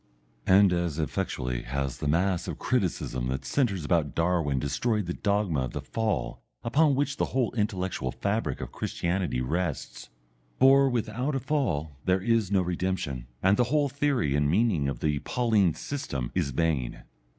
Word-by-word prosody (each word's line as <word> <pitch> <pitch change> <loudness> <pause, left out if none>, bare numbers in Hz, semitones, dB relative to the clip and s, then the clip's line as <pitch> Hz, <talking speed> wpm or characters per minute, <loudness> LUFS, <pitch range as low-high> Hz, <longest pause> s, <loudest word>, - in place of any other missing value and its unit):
And 95 0 +6
as 85 -3 -1
effectually 65 -5 -2
has 70 +1 -3
the 75 - -2
mass 85 +4 +1
of - - -4
criticism 90 - -1
that 65 +1 -3
centres 100 - 0
about 75 -4 +1
Darwin 85 -5 +1
destroyed 105 - 0
the 90 - -3
dogma 100 -7 0
of - - -7
the - - -3
Fall 110 -2 -2 0.2
upon 140 +4 +3
which 140 +1 -1
the - - +1
whole 130 -3 0
intellectual 95 - -1
fabric - - -2
of - - -6
Christianity 90 -7 -2
rests. 80 +4 -3 0.5
For 135 +1 +6
without 125 +3 -1
a - - +1
Fall 80 - -1
there 95 0 +3
is 110 -1 +1
no 95 -2 +3
redemption, 90 -8 -2 0.2
and 95 +2 +4
the 125 - +3
whole 145 +2 +1
theory 135 - 0
and 75 0 +2
meaning 90 -6 +2
of 65 -3 -5
the 75 -2 +1
Pauline 110 - +2
system 100 - -4
is - - 0
vain. 70 -4 -1
90 Hz, 160 wpm, -27 LUFS, 75-115 Hz, 0.5 s, And